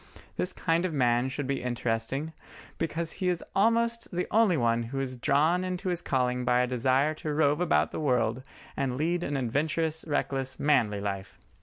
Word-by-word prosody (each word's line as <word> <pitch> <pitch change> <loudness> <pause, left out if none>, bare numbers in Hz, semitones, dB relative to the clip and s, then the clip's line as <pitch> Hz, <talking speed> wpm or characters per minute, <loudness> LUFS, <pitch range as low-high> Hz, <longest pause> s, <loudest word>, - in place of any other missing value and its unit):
This 180 - 0
kind 165 0 0
of 180 -4 -2
man 120 -1 +2
should 140 +1 -4
be 135 0 -2
interesting, 125 +5 -2 0.5
because 165 0 -1
he 185 - -1
is 175 -2 -1
almost 230 +3 +2
the 180 +1 -2
only 215 -6 +4
one 115 -2 +2
who 125 +4 -4
is 130 -1 -3
drawn 155 +8 +2
into 185 0 -3
his 175 -1 0
calling 125 -3 0
by 125 0 +3
a - - +2
desire 130 +4 +1
to 155 0 -5
rove 150 +1 +2
about 75 - +2
the - - -4
world 125 -5 +1 0.3
and 130 -2 -1
lead 170 +4 0
an 145 -4 -2
adventurous, 155 +5 -1
reckless, 135 -3 -1
manly 115 -9 +2
life. 100 -2 -4
140 Hz, 180 wpm, -28 LUFS, 125-165 Hz, 0.5 s, only